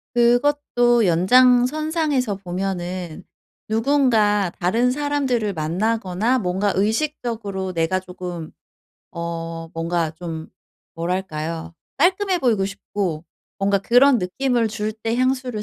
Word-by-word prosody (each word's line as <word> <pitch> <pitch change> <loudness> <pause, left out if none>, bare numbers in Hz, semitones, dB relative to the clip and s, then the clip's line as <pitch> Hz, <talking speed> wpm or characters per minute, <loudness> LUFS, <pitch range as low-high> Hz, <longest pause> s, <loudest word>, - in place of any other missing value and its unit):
그것도 240 -1 +3
연장선상에서 255 - +3
보면은 180 -2 -4 0.4
누군가 220 -5 +2
다른 230 +7 +2
사람들을 265 -6 0
만나거나 195 +7 0
뭔가 190 +1 0
의식적으로 215 -4 -2
내가 170 +3 0
쪼금 180 -3 -7 0.6
어 165 -1 -5
뭔가 165 -1 -1
좀 160 -1 -7 0.5
뭐랄까요. 165 -2 -3 0.2
깔끔해 370 +4 +2
보이고 230 - +2
싶고 195 -4 -4 0.3
뭔가 200 0 +2
그런 245 +6 +5
느낌을 235 +5 0
줄 215 -1 -3
때 225 +1 -3
향수를 255 -3 0
210 Hz, 245 characters per minute, -22 LUFS, 180-250 Hz, 0.6 s, 그런